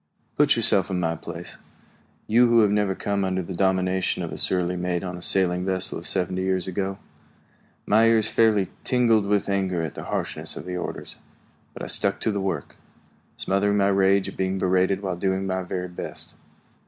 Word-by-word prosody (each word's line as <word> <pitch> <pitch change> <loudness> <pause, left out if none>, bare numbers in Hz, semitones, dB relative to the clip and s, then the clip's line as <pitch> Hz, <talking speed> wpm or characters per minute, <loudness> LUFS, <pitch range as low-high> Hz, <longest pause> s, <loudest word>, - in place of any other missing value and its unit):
Put - - +4
yourself 95 -1 +7
in 95 -2 -1
my 85 -1 -1
place, 85 +2 -8 0.7
you 120 +3 +4
who 115 -1 +5
have 105 -2 +3
never 105 -2 +1
come 100 0 -2
under 95 -1 -1
the 95 - -7
domination 95 0 0
of - - -5
a - - -6
surly 90 -1 0
mate 90 0 -2
on 90 -1 -5
a 90 - -9
sailing 90 -1 +1
vessel 95 -1 -1
of - - -9
seventy 95 0 -1
years 95 -1 -1
ago. 95 +1 -3 0.9
My 110 +2 +4
ears 110 -2 +3
fairly 110 -4 +2
tingled 115 -5 +2
with 105 0 +1
anger 95 -3 -1
at 80 - -4
the - - -8
harshness - - -3
of - - -8
the 90 0 -5
orders, 90 - -6 0.6
but - - -7
I - - -3
stuck - - 0
to 110 - 0
the 100 -1 -2
work, 95 -3 -4 0.6
smothering 100 +1 0
my 100 0 +3
rage 95 0 +2
at - - -8
being 95 0 -1
berated 95 +1 +1
while 95 -2 -2
doing 95 +1 -1
my 95 -1 -2
very 90 0 -4
best. 90 - -8
95 Hz, 190 wpm, -24 LUFS, 90-100 Hz, 0.9 s, yourself